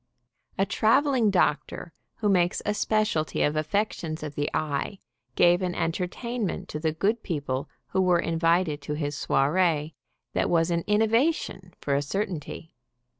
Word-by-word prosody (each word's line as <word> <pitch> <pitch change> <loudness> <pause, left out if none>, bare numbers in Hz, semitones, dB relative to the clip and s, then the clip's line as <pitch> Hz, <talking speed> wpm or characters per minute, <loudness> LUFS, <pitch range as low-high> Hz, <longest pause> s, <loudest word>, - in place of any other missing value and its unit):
A 195 - +3
traveling 230 +3 +3
doctor 170 -2 0 0.2
who 215 - -1
makes 180 -3 +2
a 210 - +1
specialty 210 -7 0
of 150 - +1
affec 200 +8 0
tions 155 -1 -5
of 150 -1 -5
the 145 +1 -1
eye, 155 +5 -2 0.4
gave 175 +1 +5
an 180 -1 -2
entertainment 185 +7 -2
to 150 - -4
the 160 0 0
good 205 +8 0
people 140 -6 -3 0.2
who 190 - +1
were 180 -2 +4
invited 165 -2 +1
to 150 +1 -4
his 145 -1 -3
soiree, 150 +2 +1 0.4
that - - +1
was 165 0 +2
an 170 0 +1
in 210 +1 +3
novation, 225 - 0
for 140 - -1
a 140 - +2
certainty. 165 -1 -4
175 Hz, 155 wpm, -26 LUFS, 155-205 Hz, 0.4 s, gave